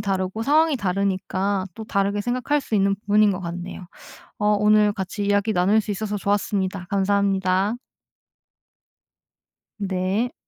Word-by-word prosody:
다르고 195 +1 -2
상황이 305 +2 +3
다르니까 195 0 -1
또 220 - -7
다르게 200 0 0
생각할 255 +6 0
수 225 - -5
있는 195 0 +3
부분인 210 +1 +3
것 185 - -2
같네요. 175 +1 -6 0.5
어 210 - 0
오늘 210 0 +4
같이 195 +1 -4
이야기 205 +2 +1
나눌 195 +5 +3
수 210 - -11
있어서 210 +1 -3
좋았습니다. 195 -2 -1
감사합니다. 195 0 +1 2.1
네. 195 +5 -1
200 Hz, 300 characters per minute, -23 LUFS, 190-210 Hz, 2.1 s, 오늘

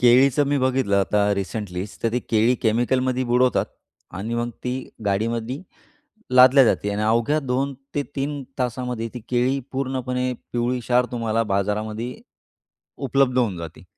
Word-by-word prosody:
केळीचं 130 +3 +5
मी 145 0 +2
बघितलं 130 -6 +1
आता 100 +1 +2
रिसेंटलीचं. 100 -1 -5
तर 115 -1 +1
ते 125 - +2
केळी 115 +3 +4
केमिकलमध्ये 125 +3 +1
बुडवतात 125 +1 +3 0.6
आणि 115 +4 -3
मग 120 0 -1
ती 125 - -1 0.3
गाडीमधी 115 +6 -1 0.7
लादल्या 130 +2 +8
जाते 105 - +1
आणि 100 +1 -2
अवघ्या 115 +7 +2
2-3 140 +2 -3 0.2
तासामध्ये 125 -2 -2
ती 125 - -5
केळी 125 +2 +1
पूर्णपणे 130 -1 -1 0.2
पिवळी 120 +1 0
क्षार 125 +1 +2
तुम्हाला 115 -2 0
बाजारामध्ये 105 +4 -2 0.9
उपलब्ध 130 0 +2
होऊन 110 -7 +1
जाती. 85 0 -9
125 Hz, 130 wpm, -23 LUFS, 110-130 Hz, 0.9 s, लादल्या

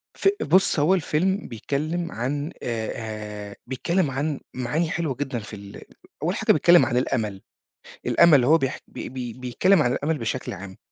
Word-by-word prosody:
ف - - 0
بُصّ، 185 -4 +3
هو 155 +6 +4
الفيلم 190 +3 0
بيتكلّم 155 +9 -3
عن 145 +7 -3
آآ، 110 -3 -4
آآ - - -11
بيتكلّم 160 +5 0
عن 140 +2 -2
معاني 150 +6 -1
حلوة 165 -6 -2
جدًا 130 -2 -3
في 105 0 -9
ال 100 0 -11 0.4
أول - - 0
حاجه - - +3
بيتكلّم 170 +3 +6
عن 125 - 0
الأمل. 110 -6 -1 0.7
الأمل، 155 -7 +6
هو 155 +6 +5
بيح 135 -4 -2
بي - - -7
بي 125 -2 -5
ببيتكلّم 130 - +2
عن 120 -2 +1
الأمل 155 +3 -1
بشكل 115 +2 -3
عام، 95 0 -9
135 Hz, 165 wpm, -24 LUFS, 115-160 Hz, 0.7 s, بيتكلّم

